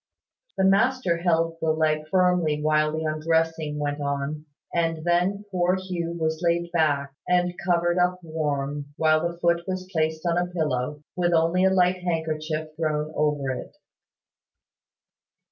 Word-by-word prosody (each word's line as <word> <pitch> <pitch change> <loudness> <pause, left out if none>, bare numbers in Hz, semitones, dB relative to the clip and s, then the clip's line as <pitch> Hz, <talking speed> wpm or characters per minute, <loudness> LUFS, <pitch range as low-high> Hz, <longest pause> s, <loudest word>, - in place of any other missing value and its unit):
The 190 - +2
master 200 -1 +3
held 165 -1 +1
the 160 - +1
leg 155 -1 +1
firmly 180 -4 +2
while 155 0 +2
the 160 +1 -3
undressing 160 0 0
went 145 0 -2
on; 140 +2 -3 0.3
and 165 -2 0
then 180 +4 +1
poor 180 0 +2
Hugh 180 -3 -4
was 160 -1 -2
laid 170 0 0
back, 145 -5 +1
and 180 0 +2
covered 175 0 +2
up 180 +1 +2
warm, 145 -2 -3
while 155 0 +3
the 170 - -13
foot 170 0 +2
was 185 -1 -3
placed 160 -1 -1
on 170 0 +2
a 180 - 0
pillow, 150 -3 -2
with 175 -1 +1
only 165 +3 +3
a - - +5
light 185 -1 +3
handkerchief 155 -2 -2
thrown 155 -1 -1
over 150 -3 0
it. 130 - -7
165 Hz, 145 wpm, -25 LUFS, 155-175 Hz, 0.3 s, a